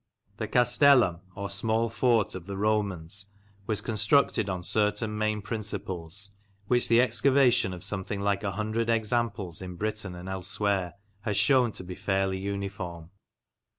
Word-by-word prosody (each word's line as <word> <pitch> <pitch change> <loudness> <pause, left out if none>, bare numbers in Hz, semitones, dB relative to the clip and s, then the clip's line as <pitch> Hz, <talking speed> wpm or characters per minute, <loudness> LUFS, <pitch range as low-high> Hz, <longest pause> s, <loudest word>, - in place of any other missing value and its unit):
The - - -3
castellum, 125 - +5 0.2
or 100 0 -5
small 110 +3 +1
fort, 115 -1 +1
of 95 -1 -8
the 100 -1 -5
Romans 100 -3 -1 0.4
was 110 - -1
constructed 110 0 +2
on 90 -2 -3
certain 105 +2 0
main 105 -1 -1
principles, 95 -4 -4 0.3
which 120 +3 +3
the 115 0 +5
excavation 125 -3 +3
of 90 -1 -4
something 100 0 -2
like 100 0 0
a 100 -1 -2
hundred 110 +2 -2
examples 110 -6 -1
in 90 -1 -7
Britain 105 -1 -3
and 90 +1 -9
elsewhere 95 0 -1 0.2
has 100 -1 -2
shewn 125 +2 +4
to - - -6
be 90 0 -7
fairly 95 0 -1
uniform. 95 -4 -5
100 Hz, 145 wpm, -28 LUFS, 95-110 Hz, 0.4 s, castellum